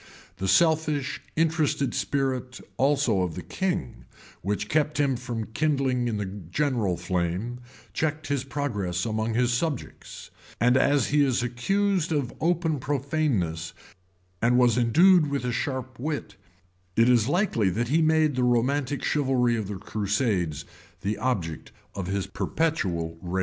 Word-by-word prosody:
The 95 - -2
selfish, 155 - +2
interested 155 -5 +1
spirit 130 -2 -2 0.2
also 135 -7 +2
of 90 -3 -2
the 90 - -6
king, 80 - -3 0.4
which 105 +2 -2
kept 150 +2 +1
him 140 -2 +2
from 115 -3 -5
kindling 135 -4 +1
in 110 -3 -1
the 105 - -2
general 100 - -1
flame, 90 +7 -2 0.3
checked 155 -1 -2
its 140 -3 0
progress 105 -11 -2
among 110 0 -1
his 125 0 +2
subjects; 145 +1 -4 0.3
and 125 +3 +4
as 140 0 +3
he 145 0 +4
is 130 -3 +1
accused 180 +9 0
of 140 -6 -1
open 165 -3 +1
profaneness,[] 130 - -1 0.7
and 120 +2 +3
was 120 -3 +4
endued 160 +8 +5
with 140 -3 -2
a 125 - 0
sharp 130 0 -3
wit,[] 145 -7 -3 0.6
it 115 +1 +4
is 120 -3 +4
likely 145 - +2
that 115 +6 -1
he 160 +4 +3
made 155 -2 +3
the 130 - +1
romantic 130 +3 +1
chivalry 130 -4 +2
of 110 -4 -3
the 105 - -4
crusaders 100 - -1 0.4
the 100 +2 -1
object 100 -11 -2 0.2
of 95 -3 -4
his 100 0 -1
perpetual 95 - -2
raillery. 90 +1 -2
125 Hz, 145 wpm, -26 LUFS, 105-145 Hz, 0.7 s, endued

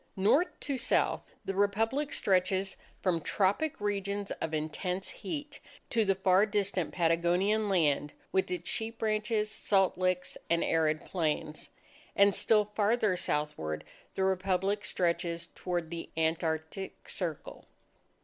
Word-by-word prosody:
North 215 - +4
to 275 -3 -2
South, - - +2 0.2
the 195 - -2
Republic 225 +9 +1
stretches 190 0 +1 0.3
from 175 -3 +2
tropic 205 - +1
regions 200 -1 -2
of 160 - -1
intense 170 +5 -2
heat 290 -3 -6 0.3
to 230 -2 +3
the 195 -2 +2
far 190 +2 +4
distant 200 -4 0
Patagonian 175 +5 +2
land 150 -5 +2 0.2
with 190 -1 +1
its 180 -1 -4
sheep 225 +1 -2
ranches, 215 0 0
salt 195 -4 +2
licks, 185 0 0
and 170 0 +2
arid 155 -1 +1
plains, 155 -3 -2 0.5
and 200 0 +6
still 210 +1 +4
farther 210 -1 +1
southward 150 - -2 0.3
the 190 - 0
Republic 190 +2 +1
stretches 170 -2 -1
toward 175 -3 -3
the 170 -1 -5
Antartic 160 +3 -2
Circle. 165 -6 -4
190 Hz, 125 wpm, -31 LUFS, 170-210 Hz, 0.5 s, and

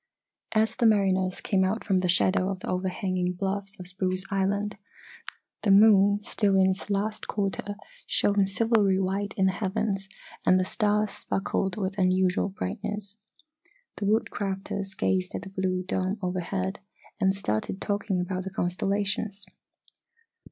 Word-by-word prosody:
As 220 0 +2
the 235 - +3
mariners 190 -3 +2
came 190 -2 +2
out 200 +4 0
from 190 -3 +2
the 180 -1 0
shadow 185 +1 +3
of 190 -2 -4
the - - -7
overhanging 185 0 -1
bluffs 195 +2 -3
of 180 - -6
Spruce 185 0 -2
Island 200 +1 0 0.8
the 210 - 0
moon, 205 0 +6
still 200 -2 +2
in 190 0 +5
its 190 +2 -6
last 210 +2 -1
quarter, 205 0 -2 0.3
shone 200 -1 +2
silvery 205 -1 +3
white 195 +2 -1
in 190 - +3
the 190 - +4
heavens 195 0 -2 0.3
and 185 0 +5
the 185 - +1
stars 210 0 +1
sparkled 195 -1 -2
with 195 -1 -2
unusual 185 +1 +2
brightness. 200 - -5 0.8
The 205 - -3
Woodcrafters 195 -2 -1
gazed 185 -1 0
at - - -4
the 195 - -8
blue 185 -1 -1
dome 185 +2 -1
overhead, 185 +1 -2 0.4
and 190 -1 +3
started 150 - -2
talking 205 -2 -1
about 185 +1 -2
the 190 - -4
constellations. 195 +3 -1
195 Hz, 145 wpm, -27 LUFS, 185-205 Hz, 0.8 s, moon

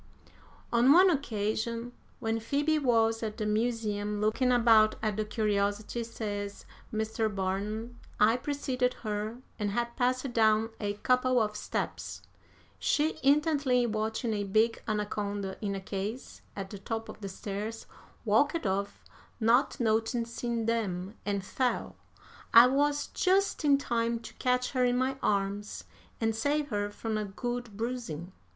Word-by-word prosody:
"'On 240 +3 +5
one 365 +4 +7
occasion, 230 -3 -2 0.3
when 225 0 -1
Phoebe 290 +7 +1
was 225 -4 +2
at 215 -2 -4
the 215 - -2
Museum 210 -2 -1
looking 220 +4 +2
about 225 -3 +5
at 215 -2 0
the 215 - 0
curiosities,' 210 +1 -1
says 205 -3 -5 0.3
Mr. 220 0 -1
Barnum, 210 +4 -3 0.2
'I 220 +3 +5
preceded 255 -2 -1
her 215 +2 -2 0.2
and 205 -1 0
had 235 +3 -2
passed 255 0 0
down 220 0 +3
a 205 -1 -1
couple 250 +4 +2
of 210 -1 0
steps. - - -4 0.6
She, 305 +2 +1
intently 280 -3 +3
watching 220 +1 -1
a 205 -1 -1
big 220 +3 +2
anaconda 205 -2 -2
in 200 -1 -1
a - - -3
case 200 +5 -5
at 195 -1 -6
the 200 - -7
top 225 +2 -4
of - - -10
the 200 - -4
stairs, 205 +3 -5 0.4
walked 285 +9 +2
off, 200 +1 -2 0.4
not 235 +4 +3
noticing 230 0 0
them, 200 -4 -1
and 200 -2 -1
fell. 250 +5 -1 0.6
I 230 +1 +11
was 285 +3 +2
just 385 -1 +1
in 285 -2 +5
time 235 -3 -1
to 225 - -10
catch 250 0 +1
her 255 -2 +1
in 245 0 +2
my 265 +1 0
arms 200 0 -1 0.4
and 225 -1 0
save 285 +5 0
her 205 -2 -1
from 215 +1 -3
a 210 - -2
good 240 +1 -5
bruising'. 220 -8 -4
225 Hz, 145 wpm, -30 LUFS, 210-250 Hz, 0.6 s, I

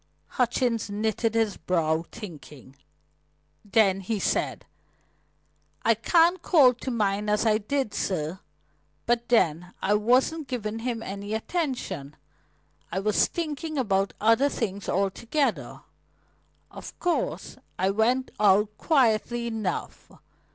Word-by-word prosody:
Hutchings 240 -3 0
knitted 220 +2 -1
his 225 -3 +1
brow, 165 -2 0
thinking; 150 - -11 0.9
then 195 -2 +3
he 210 +3 -2
said: 195 - -1 1.2
"I 230 - +5
can't 335 - +3
call 285 -9 +5
to 250 +2 -6
mind 210 -3 0
as 210 +2 +1
I 215 -1 +3
did, 245 0 -2
sir. 175 -3 -2 0.7
But, 240 0 0
then, 180 -6 +1
I 200 - +1
wasn't 255 +8 +2
giving 225 -3 -4
him 230 -1 -3
any 200 +2 -5
attention. 220 - -3 0.8
I 185 - -3
was 210 +1 +2
thinking 310 -1 -4
about 195 -6 0
other 230 +6 +4
things 200 -6 -4
altogether. 225 - -1 0.9
Of - - -10
course, 355 -2 -2 0.2
I 190 +1 +1
went 240 +5 +1
out 210 +1 +3
quietly 240 -5 +2
enough. 220 -5 -4
220 Hz, 115 wpm, -26 LUFS, 195-250 Hz, 1.2 s, I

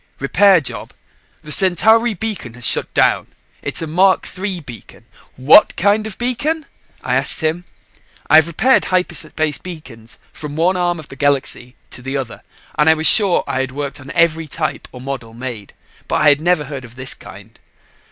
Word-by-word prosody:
Repair 185 +7 +4
job. 140 - -6 0.5
The 150 - -9
Centauri 215 +6 +3
beacon 185 - -5
has 125 -1 -6
shut - - +1
down. - - +2 0.3
It's - - -3
a - - -2
Mark 185 +5 +2
III 190 -1 -4
beacon...." 120 -7 -13 0.3
"What 135 +10 +5
kind 205 +3 +1
of 210 - -8
beacon?" 285 +6 -2 0.4
I - - -2
asked - - +2
him. 160 +3 -2 0.6
I 155 - +6
have 160 0 +5
repaired 250 +11 +2
hyperspace 155 -5 -1
beacons 120 -10 -11 0.2
from 145 -1 -8
one 175 +4 +1
arm 175 -1 0
of 155 - -12
the - - -11
Galaxy 135 -2 -1 0.2
to - - -8
the 135 +2 -4
other 125 -4 -6 0.4
and 150 +1 +5
was 155 - -1
sure 195 -1 +5
I - - -3
had 130 -1 -3
worked 140 0 -5
on 135 0 -12
every 165 -2 +2
type 155 +2 -4
or 125 - -11
model 125 -4 -7
made. 120 -5 -7 0.4
But - - 0
I 150 - +6
had 145 +1 +2
never 175 -2 +1
heard 140 -2 -7
of 120 -1 -14
this 130 0 -2
kind. - - -14
155 Hz, 180 wpm, -17 LUFS, 135-185 Hz, 0.6 s, I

